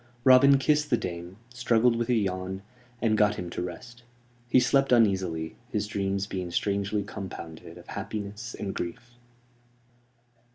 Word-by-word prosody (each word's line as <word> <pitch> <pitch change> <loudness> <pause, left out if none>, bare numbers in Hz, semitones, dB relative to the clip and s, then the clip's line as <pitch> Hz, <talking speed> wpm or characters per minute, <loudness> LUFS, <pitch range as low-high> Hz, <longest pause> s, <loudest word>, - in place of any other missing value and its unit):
Robin 135 +2 +7
kissed 150 +2 +2
the 120 - +3
dame, 85 0 -6 0.2
struggled 120 -1 +3
with 120 +1 -2
a 125 - +4
yawn, 95 -2 -2 0.4
and 110 -2 +3
got 105 -1 +3
him 90 -1 -6
to - - -4
rest. 120 +7 -7 0.5
He 130 - +6
slept 135 +2 +3
uneasily, 95 -9 +2
his 105 -2 -1
dreams 100 -1 -1
being 95 -3 -4
strangely 100 +3 0
compounded 90 -5 -8
of - - -13
happiness 105 +3 -6
and 100 -2 -4
grief. 120 +8 -6
105 Hz, 140 wpm, -27 LUFS, 95-120 Hz, 0.5 s, Robin